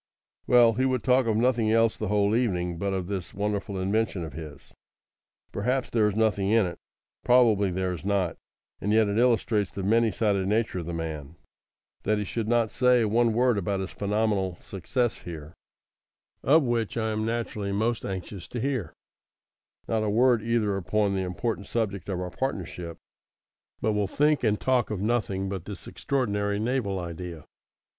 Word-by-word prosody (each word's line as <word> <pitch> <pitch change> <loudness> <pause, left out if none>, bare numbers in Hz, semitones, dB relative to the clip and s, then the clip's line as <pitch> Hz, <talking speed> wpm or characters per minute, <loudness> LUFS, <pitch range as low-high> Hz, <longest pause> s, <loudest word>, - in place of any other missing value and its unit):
Well, 120 -2 +6
he 130 +4 +1
would 130 -2 -1
talk 130 -1 +3
of 110 -1 +2
nothing 115 -2 +2
else 115 0 +3
the 110 - -4
whole 105 +1 +2
evening 90 -8 0
but 100 +1 -1
of 95 -2 -2
this 95 -1 -5
wonderful 100 -1 -2
invention 100 -1 0
of 80 -4 -7
his. 75 -2 -10 0.8
Perhaps 125 +5 -1
there 110 -3 +3
is 105 - -1
nothing 105 -3 +1
in 110 -1 +4
it 90 -1 -6 0.4
probably 115 -5 +4
there 90 0 -1
is 85 - -7
not; 95 -4 0 0.4
and 105 - -1
yet 110 0 +4
it 100 +2 0
illustrates 115 -4 +2
the 100 - -6
many 115 +3 +3
sided 100 -3 0
nature 110 -2 0
of 85 - -6
the 85 - -4
man, 80 -2 -5 0.7
that 105 +1 +1
he 105 - -1
should 110 +2 -3
not 115 -2 +2
say 125 -2 +3
one 115 +2 +3
word 120 -2 +3
about 100 +1 -1
his 95 0 -4
phenomenal 100 -3 0
success 120 +6 -2
here 80 -2 -8 0.9
of 155 +4 +5
which 120 -3 -1
I 110 -1 0
am 110 0 -1
naturally 110 -3 -2
most 110 +3 0
anxious 95 -1 -6
to 120 - -5
hear 125 - -2 0.9
not 110 -1 0
a 110 - 0
word 120 +2 +4
either 110 -3 0
upon 100 +2 0
the 95 - 0
important 95 +2 -3
subject 100 -5 -2
of 95 -2 -2
our 90 -1 -4
partnership, 90 -9 -4 0.8
but 110 - +1
will 105 -1 0
think 150 +7 +2
and 105 -2 +2
talk 130 -3 +1
of 105 -3 -3
nothing 100 -3 0
but 95 -3 -5
this 100 -3 -8
extraordinary 105 -6 -1
naval 110 -4 -1
idea. 85 -2 -7
105 Hz, 175 wpm, -27 LUFS, 95-115 Hz, 0.9 s, Well